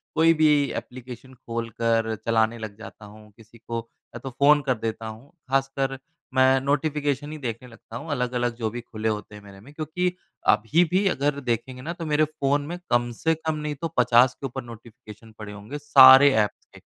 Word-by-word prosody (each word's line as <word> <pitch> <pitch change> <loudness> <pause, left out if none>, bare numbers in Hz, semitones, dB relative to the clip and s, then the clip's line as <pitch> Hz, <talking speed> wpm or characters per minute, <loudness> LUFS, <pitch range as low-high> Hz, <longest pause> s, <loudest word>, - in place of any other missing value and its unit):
कोई 165 +1 +5
भी 155 -1 +3 0.3
एप्लीकेशन 125 +1 -9
खोलकर 115 -1 -2
चलाने 115 0 +1
लग 110 -3 -8
जाता 110 -1 -12
हूँ, 105 0 -15
किसी 115 +1 -18
को 115 0 -5 0.4
या - - -6
तो 135 - -7
फ़ोन 145 +3 +4
कर 130 -2 0
देता 110 0 -4
हूँ। 110 +5 -10 0.2
ख़ासकर 135 0 -1 0.4
मैं 130 0 +4
नोटिफिकेशन 145 0 -1
ही 155 - -6
देखने 125 -2 -6
लगता 115 -1 -14
हूँ, 150 +6 -9
अलग-अलग 125 -2 -1
जो 115 -2 -2
भी 120 +2 -6
खुले 110 -1 -4
होते 105 -1 -5
हैं 105 - -11
मेरे 100 -1 -14
में, 135 +9 -16
क्योंकि 170 +4 -2 0.3
अभी 145 +11 +3
भी 195 +2 +2
अगर 140 -4 0
देखेंगे 125 0 -3
ना 165 +5 -5
तो 170 -2 -7
मेरे 155 0 +2
फ़ोन 145 -1 -1
में 175 - -5
कम 120 0 +1
से 160 0 +3
कम 160 0 -3
नहीं 150 -1 -4
तो 165 - -1
50 125 +1 +5
के - - -9
ऊपर 130 0 -5
नोटिफिकेशन 115 -1 -13
पड़े 105 -1 -8
होंगे, 105 +8 -8
सारे 140 -1 +8
ऐप्स 105 -3 0
के - - -15
125 Hz, 195 wpm, -24 LUFS, 115-145 Hz, 0.4 s, सारे